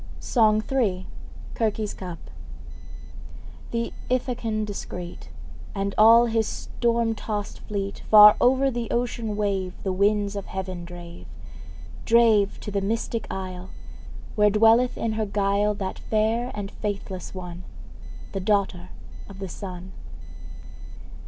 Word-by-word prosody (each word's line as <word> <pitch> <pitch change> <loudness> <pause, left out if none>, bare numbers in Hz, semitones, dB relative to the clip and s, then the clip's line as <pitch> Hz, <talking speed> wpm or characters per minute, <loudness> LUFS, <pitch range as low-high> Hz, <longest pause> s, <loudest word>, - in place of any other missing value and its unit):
SONG 215 -3 +3
III. 200 -9 +1 0.5
CIRCE'S 215 -2 -1
CUP. 180 -3 -7 1.5
Th' 230 0 -2 0.2
Ithacan 240 -4 -1
discreet, 180 -4 -7 0.5
And 200 0 -2
all 230 +2 +7
his 225 -2 +1
storm 235 -1 -1
tossed 210 -2 -4
fleet, 200 -1 -4
Far 210 -1 +10
o'er 265 +2 +4
the 235 -2 -3
ocean 235 -3 -2
wave 195 -3 -1
The 190 - -1
winds 205 +1 +1
of 200 - -5
heaven 185 -2 -5
drave 175 0 -10 0.8
Drave 225 -4 +4
to 210 - -6
the 200 0 0
mystic 225 +2 -2
isle, 185 -1 -6 0.6
Where 210 -1 +4
dwelleth 225 +4 +4
in 225 -1 -1
her 215 0 -1
guile 200 +1 +1
That 190 -2 -4
fair 225 +3 0
and 200 -1 -5
faithless 195 -3 -5
one, 180 -1 -7 0.7
The 195 - -3
daughter 195 -2 0 0.4
of 195 - -10
the 195 0 -5
Sun. 185 -1 -8
210 Hz, 120 wpm, -25 LUFS, 190-225 Hz, 1.5 s, Far